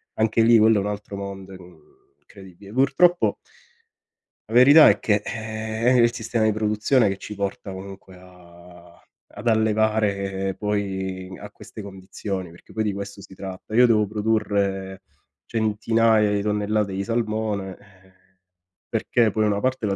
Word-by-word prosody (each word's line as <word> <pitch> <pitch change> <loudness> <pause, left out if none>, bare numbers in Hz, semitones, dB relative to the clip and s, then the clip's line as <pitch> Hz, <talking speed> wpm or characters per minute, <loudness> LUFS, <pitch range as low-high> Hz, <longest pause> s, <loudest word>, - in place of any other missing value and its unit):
Anche 110 +1 +1
lì 115 0 +6
quello 110 0 +5
è - - +1
un 100 - -3
altro 105 -1 -6
mondo, 100 -1 -7
uhm, 90 -1 -14 0.4
incredibile. 100 0 -15
Purtroppo 140 +7 +3 1.1
la - - -7
verità 140 +6 +8
è 105 - +2
che, 105 -1 +1
ehm, 110 +2 -1
è - - +5
il 120 0 +3
sistema 115 -1 -2
di 110 - +3
produzione 110 +3 +1
che 95 -1 -2
ci 105 - -9
porta 100 0 -4
comunque 95 0 -10
a 90 -1 -17 0.4
ad - - -7
allevare 105 -3 0
poi 95 -3 -3
a 105 - -9
queste 110 - -11
condizioni, 95 -1 -6
perché 85 - -17
poi 110 - -1
di 105 - 0
questo 100 0 -7
si 95 - -14
tratta. 95 +2 -9
Io 125 +2 +7
devo 110 -2 +3
produrre 100 -3 -2 0.4
centinaia 110 0 +2
di 100 -1 0
tonnellate 105 0 -1
di 95 +1 -3
salmone, 110 -3 -2
ehm, 95 -1 -23 0.8
perché 115 -3 +1
poi 110 +1 0
una 100 -1 0
parte 130 -3 -1
la 100 -1 0
105 Hz, 155 wpm, -23 LUFS, 95-110 Hz, 1.1 s, verità